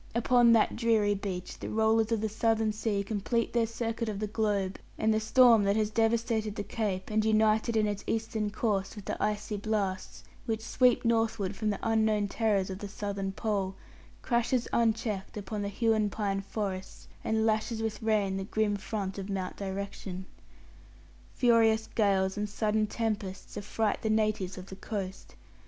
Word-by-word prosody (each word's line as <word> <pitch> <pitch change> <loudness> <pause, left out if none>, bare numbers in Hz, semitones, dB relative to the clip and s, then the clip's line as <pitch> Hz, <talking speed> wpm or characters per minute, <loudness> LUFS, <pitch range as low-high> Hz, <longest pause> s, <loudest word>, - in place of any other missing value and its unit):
Upon 240 0 +5
that 225 - +3
dreary 220 -3 +3
beach 190 -3 -5
the - - -5
rollers 220 +1 +2
of 225 -2 +1
the 220 - +1
southern 220 0 +1
sea 210 -2 -1
complete 220 +3 -1
their 235 -1 +2
circuit 230 0 -3
of 210 - -3
the 215 - -2
globe, 205 -3 -1 0.2
and 220 0 +2
the 215 - +2
storm 230 0 +6
that 200 +1 +2
has 215 -1 +1
devastated 225 -1 +1
the 205 - -3
Cape, 205 -2 -3
and 215 0 +2
united 220 +1 +3
in 215 - +3
its 205 -1 -2
eastern 220 -1 -1
course 205 -2 -1
with 205 - -9
the - - -2
icy 210 0 -1
blasts 200 -3 -2 0.2
which 220 -1 -2
sweep 250 -1 +3
northward 225 -4 +1
from 215 +2 -1
the 205 - -1
unknown 220 -2 +2
terrors 200 -3 0
of 190 - -6
the 205 - -5
southern 200 -1 -3
pole, 195 -2 -2 0.5
crashes 240 0 +1
unchecked 220 -4 0
upon 205 +1 -4
the 200 - -2
Huon 220 0 +1
pine 200 -2 -1
forests, 195 -2 -5 0.2
and 220 0 +1
lashes 220 +1 0
with 215 -1 -3
rain 210 -3 +1
the 195 - -3
grim 210 0 0
front 200 -1 -4
of 195 +1 -6
Mount 190 -2 -3
Direction. 195 -1 -5 1.1
Furious 225 -2 +4
gales 195 -3 +2
and 210 0 -2
sudden 215 +1 0
tempests 210 -4 -3
affright 210 +1 -1
the 220 - -1
natives 215 -4 0
of 185 - -7
the 190 - -9
coast. 195 -2 -6
215 Hz, 170 wpm, -30 LUFS, 200-225 Hz, 1.1 s, storm